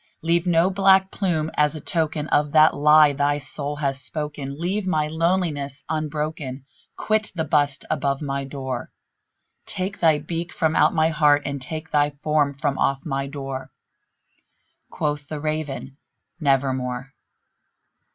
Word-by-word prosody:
Leave 170 Hz, +2 st, +2 dB
no 175 Hz, +2 st, +3 dB
black 190 Hz, 0 st, +4 dB
plume 160 Hz, -6 st, -1 dB
as 150 Hz, 0 st, +2 dB
a -, -, -5 dB
token 155 Hz, -1 st, -2 dB
of 145 Hz, 0 st, +2 dB
that 155 Hz, 0 st, +6 dB
lie 150 Hz, 0 st, +6 dB
thy 145 Hz, +1 st, +1 dB
soul 145 Hz, 0 st, -4 dB
hath 140 Hz, -2 st, -1 dB
spoken! 145 Hz, -1 st, -5 dB
Leave 190 Hz, +4 st, -1 dB
my 155 Hz, -5 st, +1 dB
loneliness 160 Hz, -4 st, -1 dB
unbroken! 150 Hz, -3 st, -3 dB, 0.3 s
quit 215 Hz, 0 st, 0 dB
the 160 Hz, -, 0 dB
bust 145 Hz, -2 st, +1 dB
above 140 Hz, -1 st, 0 dB
my 140 Hz, -2 st, -3 dB
door! 130 Hz, -2 st, -5 dB, 0.8 s
Take 190 Hz, +2 st, -3 dB
thy 160 Hz, -3 st, +4 dB
beak 165 Hz, +3 st, -4 dB
from 160 Hz, -1 st, 0 dB
out -, -, +4 dB
my 160 Hz, 0 st, +3 dB
heart, 150 Hz, -2 st, +3 dB
and 140 Hz, -1 st, -3 dB
take 155 Hz, +4 st, -6 dB
thy 145 Hz, -1 st, +3 dB
form 145 Hz, 0 st, 0 dB
from 145 Hz, -2 st, -1 dB
off 135 Hz, 0 st, 0 dB
my 135 Hz, -2 st, -2 dB
door!" 135 Hz, -2 st, -6 dB, 1.2 s
Quoth 145 Hz, -1 st, -2 dB
the 155 Hz, 0 st, -5 dB
Raven, 150 Hz, -3 st, -4 dB, 0.4 s
"Nevermore." 135 Hz, -3 st, 0 dB
150 Hz, 140 wpm, -23 LUFS, 140-160 Hz, 1.2 s, that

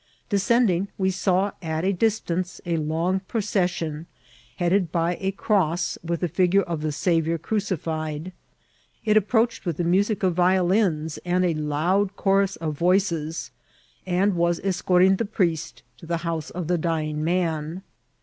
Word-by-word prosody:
Descending, 200 Hz, -2 st, +2 dB
we 190 Hz, -1 st, +1 dB
saw 190 Hz, +1 st, +1 dB
at 160 Hz, 0 st, -2 dB
a 195 Hz, -, +2 dB
distance 185 Hz, -3 st, -1 dB
a 170 Hz, -1 st, 0 dB
long 165 Hz, +5 st, 0 dB
pro 230 Hz, -, -2 dB
cession, 175 Hz, -6 st, -1 dB, 0.5 s
headed 175 Hz, -1 st, +1 dB
by 170 Hz, 0 st, +1 dB
a 190 Hz, -, -1 dB
cross 185 Hz, -4 st, 0 dB
with 170 Hz, 0 st, -2 dB
the 175 Hz, -, +1 dB
figure 180 Hz, +4 st, +2 dB
of 170 Hz, -4 st, -4 dB
the 155 Hz, 0 st, -1 dB
Sa 175 Hz, +5 st, -1 dB
viour 165 Hz, +1 st, -1 dB
crucified. 160 Hz, -5 st, -3 dB, 0.7 s
It 215 Hz, -1 st, +3 dB
approached 225 Hz, +3 st, +2 dB
with 170 Hz, -6 st, -2 dB
the 175 Hz, -, 0 dB
music 195 Hz, +5 st, +1 dB
of 180 Hz, -3 st, +2 dB
vio 180 Hz, 0 st, +3 dB
lins 170 Hz, -6 st, +1 dB
and 180 Hz, +1 st, +1 dB
a 170 Hz, -, +2 dB
loud 165 Hz, +7 st, 0 dB
chorus 195 Hz, -1 st, +2 dB
of 155 Hz, -2 st, -4 dB
voices, 170 Hz, -2 st, 0 dB, 0.5 s
and 190 Hz, +2 st, +1 dB
was 170 Hz, 0 st, +1 dB
escorting 190 Hz, 0 st, +3 dB
the 230 Hz, -, -1 dB
priest 170 Hz, -6 st, -1 dB, 0.2 s
to 165 Hz, -, -12 dB
the 170 Hz, 0 st, 0 dB
house 165 Hz, -2 st, -2 dB
of 180 Hz, -1 st, -5 dB
the 175 Hz, 0 st, +1 dB
dying 155 Hz, -2 st, -1 dB
man. 165 Hz, 0 st, -1 dB
175 Hz, 160 wpm, -24 LUFS, 165-195 Hz, 0.7 s, It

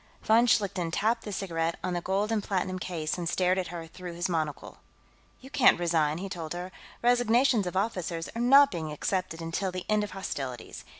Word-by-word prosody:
Von 230 Hz, +2 st, +4 dB
Schlichten 195 Hz, -6 st, +1 dB
tapped 220 Hz, +7 st, 0 dB
the 210 Hz, -, -5 dB
cigarette 165 Hz, -4 st, -2 dB
on 185 Hz, -, -1 dB
the 175 Hz, -, -1 dB
gold 200 Hz, +4 st, 0 dB
and 215 Hz, -2 st, 0 dB
platinum 185 Hz, -1 st, -2 dB
case 170 Hz, -2 st, -3 dB
and 170 Hz, -1 st, -2 dB
stared 185 Hz, +1 st, +2 dB
at 180 Hz, -, -2 dB
her 170 Hz, -1 st, -6 dB
through 175 Hz, +1 st, -9 dB
his 175 Hz, +2 st, -1 dB
monocle. 155 Hz, -4 st, -3 dB, 0.6 s
"You 265 Hz, +1 st, -13 dB
can't 250 Hz, -, +5 dB
resign," 160 Hz, -3 st, +1 dB
he 195 Hz, +3 st, -5 dB
told 170 Hz, -4 st, -5 dB
her. 180 Hz, +1 st, -6 dB, 0.3 s
"Resignations 245 Hz, -2 st, +3 dB
of 180 Hz, -, -3 dB
officers 180 Hz, -5 st, -2 dB
are 230 Hz, -, -2 dB
not 275 Hz, +3 st, +7 dB
being 160 Hz, -4 st, -4 dB
accepted 165 Hz, +1 st, -2 dB
until 175 Hz, +4 st, -2 dB
the 185 Hz, 0 st, -5 dB
end 215 Hz, 0 st, +2 dB
of 210 Hz, -, -4 dB
hostilities. 135 Hz, -, -6 dB
185 Hz, 195 wpm, -28 LUFS, 165-210 Hz, 0.6 s, not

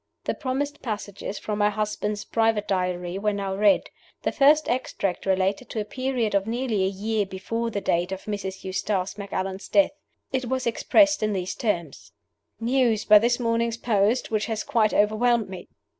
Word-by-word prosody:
The -, -, -1 dB
promised 285 Hz, +3 st, -3 dB
passages 205 Hz, -3 st, -5 dB
from 210 Hz, -1 st, -4 dB
my 205 Hz, 0 st, +4 dB
husband's 210 Hz, 0 st, -2 dB
private 225 Hz, -2 st, +1 dB
Diary 180 Hz, -1 st, -1 dB
were 210 Hz, 0 st, 0 dB
now 195 Hz, -1 st, -3 dB
read. 205 Hz, 0 st, +3 dB, 0.3 s
The -, -, +1 dB
first 300 Hz, +2 st, +4 dB
extract 200 Hz, -7 st, -2 dB
related 190 Hz, +5 st, 0 dB
to 220 Hz, -, -3 dB
a 210 Hz, -, -2 dB
period 255 Hz, -2 st, -1 dB
of 200 Hz, +1 st, +1 dB
nearly 230 Hz, -4 st, 0 dB
a -, -, +2 dB
year 210 Hz, +2 st, -1 dB
before 200 Hz, +5 st, -3 dB
the 205 Hz, -3 st, -3 dB
date 175 Hz, 0 st, 0 dB
of 190 Hz, 0 st, -5 dB
Mrs. 195 Hz, -2 st, -5 dB
Eustace 190 Hz, +1 st, -2 dB
Macallan's 195 Hz, -1 st, -4 dB
death. 300 Hz, -, +4 dB, 0.4 s
It 260 Hz, -1 st, 0 dB
was 260 Hz, +1 st, -2 dB
expressed 295 Hz, +6 st, +3 dB
in 215 Hz, -1 st, +1 dB
these 185 Hz, -1 st, -2 dB
terms: 160 Hz, -, -3 dB, 0.5 s
"News, 235 Hz, -2 st, +1 dB
by 210 Hz, -1 st, +8 dB
this 240 Hz, +3 st, +1 dB
morning's 230 Hz, -1 st, 0 dB
post, 225 Hz, +1 st, +1 dB
which 215 Hz, -1 st, 0 dB
has 220 Hz, -2 st, -2 dB
quite 220 Hz, -3 st, +2 dB
overwhelmed 215 Hz, +1 st, +2 dB
me. 185 Hz, -2 st, -8 dB
210 Hz, 175 wpm, -25 LUFS, 195-235 Hz, 0.5 s, by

